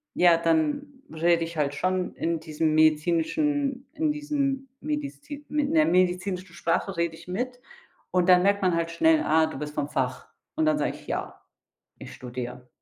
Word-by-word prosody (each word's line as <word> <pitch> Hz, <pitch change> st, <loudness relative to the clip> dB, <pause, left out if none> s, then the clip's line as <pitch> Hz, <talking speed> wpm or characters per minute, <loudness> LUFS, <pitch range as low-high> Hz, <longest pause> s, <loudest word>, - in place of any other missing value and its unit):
ja, 175 Hz, -2 st, +5 dB
dann 295 Hz, -, +1 dB, 0.3 s
rede 165 Hz, +1 st, +2 dB
ich 165 Hz, 0 st, -6 dB
halt 145 Hz, -1 st, 0 dB
schon 185 Hz, +4 st, -1 dB
in 165 Hz, -1 st, -1 dB
diesem 155 Hz, 0 st, -1 dB
medizinischen 250 Hz, -, +1 dB
in 315 Hz, -1 st, 0 dB
diesem 280 Hz, -2 st, -2 dB
medizin 295 Hz, 0 st, -5 dB
in 295 Hz, 0 st, 0 dB
der 315 Hz, -1 st, +5 dB
medizinischen 185 Hz, -, 0 dB
Sprache 170 Hz, +3 st, -1 dB
rede 170 Hz, -1 st, 0 dB
ich 165 Hz, -, -15 dB
mit. 245 Hz, +7 st, -3 dB, 0.5 s
Und 180 Hz, 0 st, +2 dB
dann 180 Hz, -1 st, +7 dB
merkt 200 Hz, +1 st, +2 dB
man 180 Hz, -2 st, +3 dB
halt 165 Hz, 0 st, -1 dB
schnell: 320 Hz, -, +4 dB
„Ah, 160 Hz, 0 st, +4 dB
du 155 Hz, -, -7 dB
bist 150 Hz, 0 st, -6 dB
vom 145 Hz, -, -2 dB
Fach.“ 130 Hz, -3 st, -2 dB, 0.3 s
Und 315 Hz, -, +1 dB
dann 310 Hz, -1 st, +3 dB
sage -, -, -1 dB
ich: -, -, -14 dB
„Ja, -, -, -4 dB, 0.6 s
ich -, -, -9 dB
studiere.“ 125 Hz, 0 st, -7 dB
180 Hz, 175 wpm, -26 LUFS, -, 0.6 s, dann